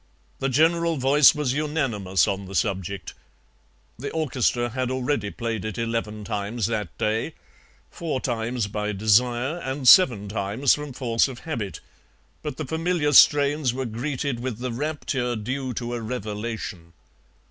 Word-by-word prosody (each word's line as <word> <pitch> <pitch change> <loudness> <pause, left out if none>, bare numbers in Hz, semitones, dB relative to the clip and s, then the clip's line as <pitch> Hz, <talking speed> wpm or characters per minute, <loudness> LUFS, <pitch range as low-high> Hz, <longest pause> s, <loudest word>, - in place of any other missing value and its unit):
The 135 - 0
general 165 +4 +2
voice 140 +3 +6
was 145 -4 0
unanimous 120 - 0
on 100 0 -2
the 95 - -8
subject. 100 -3 -2 0.9
The 140 - -4
orchestra 125 -6 0
had 130 +1 -2
already 130 -4 -1
played 115 -2 -4
it 110 -1 -5
eleven 115 -2 -3
times 105 +2 -2
that 105 -7 -3
day, 110 +8 -1 0.6
four 160 -6 -3
times 120 -2 -2
by 105 +1 -3
desire 120 - +2
and 130 -3 -3
seven 120 - +7
times 105 +6 +1
from 150 -1 -4
force 120 -2 +1
of 130 -2 -9
habit, 115 -12 -4 0.6
but 150 -4 -5
the 155 - -3
familiar 160 0 0
strains 145 -2 +5
were 130 0 -2
greeted 125 +2 -3
with 125 -3 -4
the 125 +1 -4
rapture 130 -2 -2
due 130 +4 -3
to 120 +1 -4
a 120 - -3
revelation. 110 -6 -5
120 Hz, 145 wpm, -24 LUFS, 110-140 Hz, 0.9 s, seven